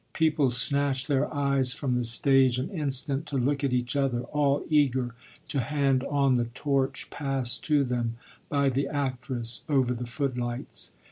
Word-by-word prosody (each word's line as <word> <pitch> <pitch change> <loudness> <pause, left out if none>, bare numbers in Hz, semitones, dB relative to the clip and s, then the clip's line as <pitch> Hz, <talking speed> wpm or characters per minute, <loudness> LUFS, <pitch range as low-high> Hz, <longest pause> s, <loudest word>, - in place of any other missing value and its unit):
People 155 -4 +2
snatched 135 +1 +1
their 145 -1 +1
eyes 140 -3 +1
from 135 -4 -1
the 125 - 0
stage 130 +2 +3
an 135 +10 -3
instant 140 -3 -1
to 140 - -2
look 140 +3 0
at 140 - +1
each 125 0 -1
other, 135 -4 +1
all 145 +1 0
eager 130 -5 +2 0.4
to 140 - 0
hand 135 0 +1
on 140 -2 +2
the 120 -1 +1
torch 135 +2 -2
passed 135 -4 0
to 150 -3 +3
them 120 -3 -2 0.3
by 140 -2 +2
the 135 +2 0
actress 130 -5 -3
over 130 -4 +2
the 120 0 -5
footlights. 125 -1 -3
135 Hz, 160 wpm, -27 LUFS, 125-140 Hz, 0.4 s, stage